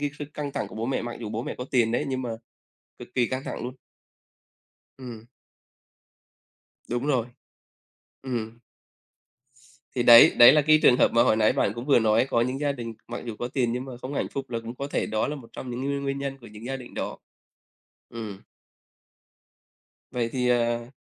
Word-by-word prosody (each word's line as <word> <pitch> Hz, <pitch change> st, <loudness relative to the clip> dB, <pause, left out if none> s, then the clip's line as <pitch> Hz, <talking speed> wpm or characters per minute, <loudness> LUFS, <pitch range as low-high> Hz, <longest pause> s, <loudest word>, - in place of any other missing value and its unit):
cái 145 Hz, 0 st, -1 dB
sức 145 Hz, -, -5 dB
căng 145 Hz, -2 st, -4 dB
thẳng -, -, -3 dB
của -, -, -12 dB
bố 115 Hz, +2 st, -3 dB
mẹ, 135 Hz, -, -1 dB
mặc 120 Hz, 0 st, -5 dB
dù 115 Hz, -, -5 dB
bố 115 Hz, +2 st, -3 dB
mẹ -, -, -5 dB
có 125 Hz, -, -4 dB
tiền 120 Hz, -3 st, +2 dB
đấy, 135 Hz, -, 0 dB
nhưng 130 Hz, -1 st, -2 dB
mà 120 Hz, -, -4 dB, 0.7 s
cực -, -, -10 dB
kỳ 125 Hz, -2 st, +2 dB
căng 130 Hz, +2 st, -4 dB
thẳng -, -, -5 dB
luôn. 125 Hz, +1 st, -5 dB, 1.3 s
Ừm. 115 Hz, -3 st, -9 dB, 1.6 s
Đúng 120 Hz, +3 st, -2 dB
rồi. 125 Hz, -5 st, +1 dB, 0.9 s
Ừm. 115 Hz, -3 st, -4 dB, 1.4 s
Thì 125 Hz, -, +1 dB
đấy, 120 Hz, -1 st, +9 dB
đấy 120 Hz, +1 st, +10 dB
là 150 Hz, +1 st, +5 dB
cái 155 Hz, +1 st, +5 dB
trường 125 Hz, -, +7 dB
hợp -, -, +4 dB
mà 120 Hz, 0 st, +4 dB
hồi 110 Hz, -, +3 dB
nãy 110 Hz, -1 st, +3 dB
bạn -, -, +1 dB
cũng 120 Hz, +1 st, -6 dB
vừa 140 Hz, -4 st, +5 dB
nói 110 Hz, +2 st, +3 dB
có 115 Hz, -, +2 dB
những 130 Hz, +3 st, -1 dB
gia 145 Hz, -1 st, +1 dB
đình, 120 Hz, -4 st, -6 dB
mặc 120 Hz, -, -6 dB
dù 115 Hz, -2 st, -5 dB
có 120 Hz, -, -2 dB
tiền 125 Hz, -2 st, 0 dB
nhưng 125 Hz, +1 st, -3 dB
mà 130 Hz, -2 st, -8 dB
không 130 Hz, +2 st, -6 dB
hạnh -, -, -1 dB
phúc 135 Hz, -1 st, -6 dB
là 115 Hz, -, -2 dB
cũng 115 Hz, +1 st, -8 dB
có 140 Hz, +2 st, -5 dB
thể -, -, -1 dB
đó 110 Hz, 0 st, -1 dB
là 150 Hz, -, -3 dB
một 125 Hz, -5 st, -12 dB
trong 130 Hz, -, -7 dB
những 120 Hz, +2 st, -4 dB
nguyên 140 Hz, 0 st, -2 dB
nguyên 140 Hz, 0 st, -2 dB
nhân 140 Hz, 0 st, -4 dB
của 120 Hz, -, -14 dB
những 105 Hz, +2 st, -11 dB
gia 135 Hz, +2 st, -3 dB
đình 125 Hz, -2 st, -10 dB
đó. -, -, -4 dB, 0.9 s
Ừm. 110 Hz, -4 st, -7 dB, 1.7 s
Vậy 120 Hz, -2 st, -1 dB
thì, 125 Hz, -1 st, 0 dB
à. 120 Hz, 0 st, 0 dB
125 Hz, 210 wpm, -26 LUFS, 115-135 Hz, 1.7 s, đấy